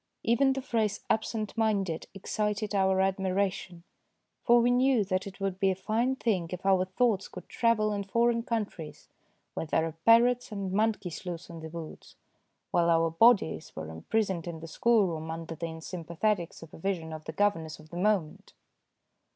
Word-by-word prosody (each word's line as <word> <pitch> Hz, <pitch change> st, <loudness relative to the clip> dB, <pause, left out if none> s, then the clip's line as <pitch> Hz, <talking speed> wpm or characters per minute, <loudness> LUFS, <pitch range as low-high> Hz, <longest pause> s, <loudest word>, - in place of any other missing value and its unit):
Even 265 Hz, +4 st, +3 dB
the 270 Hz, 0 st, -4 dB
phrase 220 Hz, -5 st, -1 dB
" -, -, -45 dB
absent 220 Hz, -1 st, -1 dB
minded 200 Hz, -7 st, 0 dB
" -, -, -45 dB
excited 210 Hz, +2 st, -2 dB
our 190 Hz, -1 st, +3 dB
admiration; 190 Hz, -2 st, -1 dB, 0.6 s
for 240 Hz, 0 st, +6 dB
we 240 Hz, +1 st, +3 dB
knew 250 Hz, -2 st, +3 dB
that 185 Hz, 0 st, -1 dB
it 195 Hz, 0 st, -10 dB
would 195 Hz, -1 st, -2 dB
be 195 Hz, -, +3 dB
a 190 Hz, -, +1 dB
fine 225 Hz, +7 st, 0 dB
thing 200 Hz, -9 st, 0 dB
if 180 Hz, +1 st, -6 dB
our 190 Hz, -1 st, +4 dB
thoughts 195 Hz, +1 st, +1 dB
could 180 Hz, -, -11 dB
travel 215 Hz, -3 st, +1 dB
in 200 Hz, -1 st, -2 dB
foreign 235 Hz, +3 st, +2 dB
coun 230 Hz, -2 st, -1 dB
tries, 160 Hz, -6 st, -11 dB, 0.4 s
where 165 Hz, -, -4 dB
there 160 Hz, -, +1 dB
are 165 Hz, -, -3 dB
parrots 240 Hz, +1 st, +5 dB
and 200 Hz, -2 st, -4 dB
monkeys 210 Hz, -5 st, -1 dB
loose 175 Hz, -1 st, -6 dB
in 165 Hz, -, -8 dB
the 160 Hz, 0 st, -7 dB
woods, 165 Hz, -1 st, -9 dB, 0.6 s
while 170 Hz, 0 st, +3 dB
our 165 Hz, 0 st, +3 dB
bodies 200 Hz, -3 st, +3 dB
were 80 Hz, 0 st, -6 dB
imprisoned 185 Hz, -, -1 dB
in 165 Hz, -2 st, -5 dB
the 165 Hz, -, -8 dB
schoolroom 175 Hz, -6 st, +1 dB
under 165 Hz, 0 st, -5 dB
the 165 Hz, +1 st, -4 dB
un 160 Hz, 0 st, -8 dB
sympathetic 175 Hz, +2 st, -2 dB
supervision 165 Hz, 0 st, -5 dB
of 155 Hz, 0 st, -8 dB
the -, -, -4 dB
governess 165 Hz, -4 st, 0 dB
of 155 Hz, 0 st, -17 dB
the 175 Hz, -, -6 dB
moment. 185 Hz, -5 st, 0 dB
195 Hz, 180 wpm, -29 LUFS, 165-220 Hz, 0.6 s, for